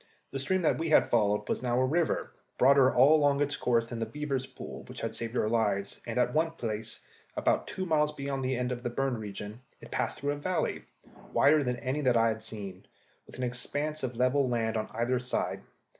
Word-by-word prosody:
The 135 Hz, -, -3 dB
stream 180 Hz, +7 st, 0 dB
that 155 Hz, -, +2 dB
we 165 Hz, 0 st, -1 dB
had 155 Hz, -, +4 dB
followed 105 Hz, -2 st, +2 dB
was -, -, -1 dB
now 125 Hz, -1 st, +1 dB
a 130 Hz, -, +3 dB
river, 160 Hz, +5 st, 0 dB, 0.2 s
broader 135 Hz, 0 st, +6 dB
all 135 Hz, +5 st, +6 dB
along 145 Hz, -2 st, +3 dB
its 145 Hz, 0 st, +1 dB
course 115 Hz, -2 st, +1 dB
than 115 Hz, 0 st, -6 dB
the 115 Hz, -, -2 dB
beavers' 135 Hz, +1 st, -3 dB
pool -, -, -9 dB
which -, -, -8 dB
had -, -, -3 dB
saved 115 Hz, +1 st, -4 dB
our -, -, +2 dB
lives, 105 Hz, -3 st, 0 dB
and 115 Hz, -, -3 dB
at 125 Hz, -, +2 dB
one 160 Hz, +1 st, +1 dB
place, 110 Hz, -6 st, -4 dB, 0.4 s
about -, -, +1 dB
two 185 Hz, -, -4 dB
miles 150 Hz, -3 st, +2 dB
beyond 140 Hz, -2 st, -3 dB
the 130 Hz, 0 st, 0 dB
end 125 Hz, 0 st, -1 dB
of 120 Hz, -1 st, -3 dB
the 120 Hz, -, -2 dB
burned 130 Hz, -1 st, -1 dB
region, 105 Hz, +2 st, -7 dB, 0.2 s
it -, -, -13 dB
passed -, -, -2 dB
through 145 Hz, +1 st, 0 dB
a 145 Hz, -, -3 dB
valley, 180 Hz, +5 st, -2 dB, 0.5 s
wider 150 Hz, +1 st, +5 dB
than 125 Hz, -1 st, 0 dB
any 130 Hz, +5 st, -2 dB
that 125 Hz, -4 st, +3 dB
I 115 Hz, 0 st, +4 dB
had 110 Hz, 0 st, -4 dB
seen, 100 Hz, -4 st, -8 dB, 0.4 s
with -, -, -12 dB
an 130 Hz, -, -3 dB
expanse 145 Hz, +5 st, -2 dB
of 125 Hz, -2 st, -3 dB
level 130 Hz, +2 st, +2 dB
land 115 Hz, -2 st, 0 dB
on 110 Hz, -, -2 dB
either 120 Hz, +2 st, 0 dB
side. 125 Hz, 0 st, -2 dB
125 Hz, 220 wpm, -30 LUFS, 115-145 Hz, 0.5 s, broader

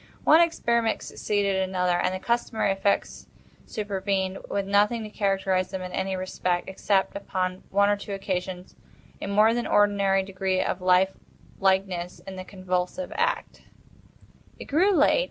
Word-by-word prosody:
One 320 Hz, +2 st, +7 dB
experiment 235 Hz, -9 st, +1 dB
succeeded 200 Hz, -2 st, -1 dB
another, 185 Hz, -2 st, +1 dB
and 185 Hz, -, +1 dB
the 185 Hz, -, -3 dB
customary 230 Hz, -1 st, 0 dB
effects 195 Hz, +1 st, -1 dB, 0.4 s
supervened, 195 Hz, -2 st, -2 dB
with 200 Hz, -1 st, -1 dB
nothing 210 Hz, +3 st, +2 dB
to 215 Hz, -, -8 dB
characterize 195 Hz, -3 st, 0 dB
them 190 Hz, -1 st, -5 dB
in 180 Hz, -, -6 dB
any 190 Hz, +1 st, -2 dB
respect, 185 Hz, -1 st, -2 dB
except, 190 Hz, 0 st, 0 dB
upon 185 Hz, -2 st, -3 dB
one 200 Hz, +1 st, +3 dB
or 205 Hz, -, +3 dB
two 200 Hz, 0 st, -7 dB
occasions, 185 Hz, -1 st, -4 dB, 0.5 s
a -, -, -4 dB
more 210 Hz, +3 st, +4 dB
than 240 Hz, 0 st, -2 dB
ordinary 200 Hz, -2 st, +3 dB
degree 190 Hz, -1 st, -1 dB
of 185 Hz, -, -1 dB
life 185 Hz, +1 st, +4 dB, 0.5 s
likeness 190 Hz, -2 st, 0 dB
in 195 Hz, -, -7 dB
the 185 Hz, -, -6 dB
convulsive 185 Hz, +7 st, -3 dB
action. -, -, -2 dB, 0.9 s
It -, -, -9 dB
grew 340 Hz, +8 st, +3 dB
late. 310 Hz, -, +4 dB
195 Hz, 150 wpm, -26 LUFS, 185-205 Hz, 0.9 s, One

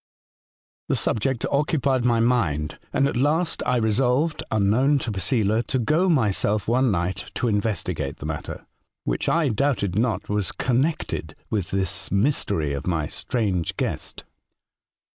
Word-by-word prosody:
*' -, -, -90 dB
The -, -, +2 dB
subject 120 Hz, +3 st, 0 dB
occupied 140 Hz, -3 st, +1 dB
my 120 Hz, -2 st, +3 dB
mind, 90 Hz, -12 st, +1 dB
and 140 Hz, -, +2 dB
at -, -, -3 dB
last 155 Hz, +7 st, +1 dB
I 125 Hz, 0 st, +2 dB
resolved, 125 Hz, +7 st, +1 dB
unknown 110 Hz, +8 st, +3 dB
to 120 Hz, -4 st, -3 dB
Posela, 105 Hz, +3 st, +1 dB
to -, -, 0 dB
go 155 Hz, +10 st, +2 dB
myself 105 Hz, -, +1 dB
one 125 Hz, +2 st, +3 dB
night 95 Hz, +1 st, -2 dB
to 125 Hz, -, 0 dB
investigate 90 Hz, -9 st, -1 dB
the -, -, -8 dB
matter, -, -, -5 dB, 0.4 s
which -, -, -1 dB
I 165 Hz, -4 st, +2 dB
doubted 110 Hz, -6 st, 0 dB
not 120 Hz, -1 st, 0 dB
was 105 Hz, -1 st, 0 dB
connected 135 Hz, +6 st, -1 dB, 0.2 s
with 100 Hz, -5 st, -1 dB
this 95 Hz, -1 st, -1 dB
mystery 100 Hz, -, +1 dB
or 70 Hz, -, -3 dB
my 85 Hz, -4 st, 0 dB
strange 95 Hz, -, -2 dB
guest. -, -, -3 dB
115 Hz, 145 wpm, -24 LUFS, 95-135 Hz, 0.4 s, my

